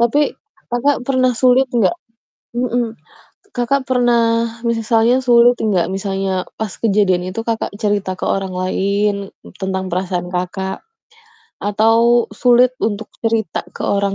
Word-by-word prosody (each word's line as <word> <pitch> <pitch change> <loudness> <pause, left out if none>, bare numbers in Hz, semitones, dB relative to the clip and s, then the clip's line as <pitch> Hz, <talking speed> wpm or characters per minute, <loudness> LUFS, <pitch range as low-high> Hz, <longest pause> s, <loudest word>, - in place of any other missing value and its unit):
Tapi 235 +5 +3 0.5
Kakak 250 +1 +1
pernah 255 -2 +2
sulit 255 +2 +4
nggak? 240 +5 +2 0.6
Mhm. 240 -2 -1 0.6
Kakak 255 +3 +1
pernah, 245 -2 +3 0.5
misalnya 230 +1 +2
sulit 245 0 +5
nggak, 195 -6 +1
misalnya 195 -1 -2
pas 220 - -2
kejadian 195 -4 +2
itu 210 - -5
Kakak 225 -1 -1
cerita 205 -3 0
ke - - -3
orang 195 -1 -1
lain 200 +2 -1 0.3
tentang 190 -1 -3
perasaan 180 0 -2
Kakak? 185 +1 -4 0.8
Atau 225 +3 +3
sulit 245 +3 +4
untuk 215 0 -2 0.2
cerita 225 -5 -1
ke - - -6
orang 200 -1 0
220 Hz, 125 wpm, -18 LUFS, 195-240 Hz, 0.8 s, sulit